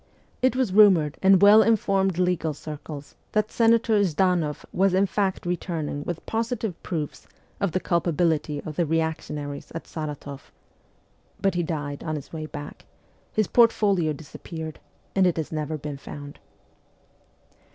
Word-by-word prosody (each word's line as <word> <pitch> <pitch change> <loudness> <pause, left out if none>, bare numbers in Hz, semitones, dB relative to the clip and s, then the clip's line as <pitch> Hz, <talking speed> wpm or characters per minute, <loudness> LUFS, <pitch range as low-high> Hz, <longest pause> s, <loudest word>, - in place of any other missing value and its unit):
It 255 0 +3
was 255 -7 0
rumoured 185 -8 +5
in 195 0 +7
well 205 +3 +8
informed 195 -5 +2
legal 180 -4 0
circles 150 -1 -8 0.2
that 215 0 +1
Senator 230 -1 +3
Zhdanoff 175 -3 +1
was 190 0 +3
in 195 +1 +4
fact 195 -1 -1
returning 165 -4 -3
with 175 -2 -5
positive 225 -4 -2
proofs 155 -4 -5 0.3
of 200 -3 0
the 185 - 0
culpability 160 -4 0
of 155 -2 -8
the 175 - +2
reactionaries 150 -2 -3
at 165 - -4
Saratoff; 145 -3 -7 0.9
but 195 -1 +1
he 175 - 0
died 145 -4 -4
on 155 -1 -2
his 145 +1 -8
way 155 -1 -5
back, 145 -2 -9 0.5
his 215 - +1
portfolio 200 -8 +3
disappeared, 160 +2 -8 0.4
and 190 -2 +5
it 175 - 0
has 160 - -3
never 155 0 -2
been 145 -1 -6
found. 145 0 -9
170 Hz, 140 wpm, -25 LUFS, 150-195 Hz, 0.9 s, well